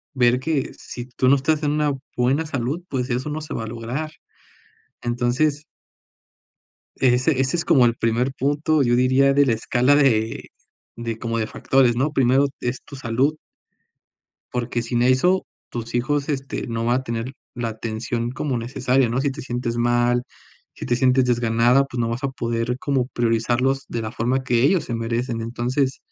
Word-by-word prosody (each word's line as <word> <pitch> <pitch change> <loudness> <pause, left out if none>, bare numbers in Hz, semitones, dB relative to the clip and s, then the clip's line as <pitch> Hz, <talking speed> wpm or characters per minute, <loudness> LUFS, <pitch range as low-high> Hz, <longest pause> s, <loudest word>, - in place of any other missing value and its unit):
ver 125 -1 +3
que 145 0 -1
si 120 -1 -8
tú 130 0 -1
no 140 - +7
estás 155 +3 0
en 145 - +1
una 150 -1 +1 0.3
buena 135 +6 +2
salud, 140 +4 -2
pues, 130 -1 -2
eso 130 +5 -1
no 155 +1 -4
se 150 - -7
va - - -3
a - - -7
lograr. 120 +7 -4 0.9
Entonces 125 +5 0 1.3
ese 130 +2 +2
ese 135 +4 +1
es 170 - -2
como 135 -8 +5
el 115 - +2
primer 120 +3 0
punto, 145 +3 +1
yo 120 -1 +3
diría, 130 +2 +4
de 145 +1 +4
la 125 - +2
escala 125 +5 +2
de 115 -6 +1 0.5
de 115 -1 -4
como 115 0 -2
de 110 - -1
factores, 130 -3 +2
¿no?, 135 +5 +1
primero 135 +1 +3
es 125 +1 -3
tu 140 - -11
salud. 130 +5 0 1.2
Porque 120 -1 -2
sin 120 0 -1
eso, 130 +10 +3 0.3
tus 115 0 -5
hijos, 140 +3 0
este, 135 -2 -3
no 115 0 -2
van 120 +2 +2
a - - -8
tener 115 +1 -4 0.2
la 120 -1 -2
atención 115 +2 -3
como 135 -1 -2
necesaria, 125 +2 +1
¿no?, 125 +3 0
si 140 0 0
te 140 - -8
sientes 120 -1 -3
mal, 120 +1 +2 0.5
si - - -7
te 120 - +1
sientes 130 0 +3
desganada, 120 +2 +3
pues, 125 -2 -6
no 115 - 0
vas 120 +4 -4
a - - +2
poder 120 -1 -2
como 135 -3 0
priorizarlos 120 +3 +1
de 115 - -3
la 110 0 -4
forma 130 +4 -1
que 120 -2 +2
ellos 170 +5 +3
se 120 - -4
merecen, 115 +1 -2
entonces. 125 +4 -1
125 Hz, 180 wpm, -22 LUFS, 120-135 Hz, 1.3 s, no